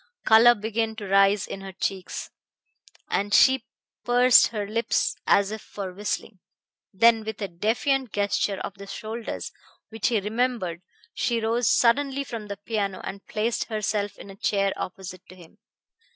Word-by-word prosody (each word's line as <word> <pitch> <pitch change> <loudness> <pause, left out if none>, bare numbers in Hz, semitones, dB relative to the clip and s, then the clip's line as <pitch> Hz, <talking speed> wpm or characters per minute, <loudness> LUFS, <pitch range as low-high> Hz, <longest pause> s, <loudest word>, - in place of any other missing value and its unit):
Color 230 +2 +7
began 220 +1 -2
to 210 -3 -7
rise 195 +1 +4
in 195 - -7
her 195 0 -8
cheeks, 190 0 -4 0.8
and 205 +1 +1
she 265 0 +5 0.4
pursed 245 0 +6
her 210 -3 -4
lips 230 +3 0
as 200 0 +4
if 220 -1 -5
for 195 -3 -7
whistling. 205 0 -4 0.5
Then 225 +3 +4
with 220 -1 -6
a 200 - -2
defiant 230 - 0
gesture 205 -1 0
of 195 0 -7
the 200 - -9
shoulders 220 +3 -6 0.4
which 225 -1 -1
he 230 -4 +2
remembered 210 -5 -2 0.3
she 235 -2 0
rose 230 +1 0
suddenly 275 +3 +2
from 230 -5 -7
the 200 -1 -6
piano 205 -2 -3
and 195 0 -7
placed 225 +2 -1
herself 215 -2 -2
in 200 - -11
a - - -12
chair 195 -1 0
opposite 185 0 -7
to 185 - -12
him. 170 -3 -17
210 Hz, 155 wpm, -25 LUFS, 195-230 Hz, 0.8 s, Color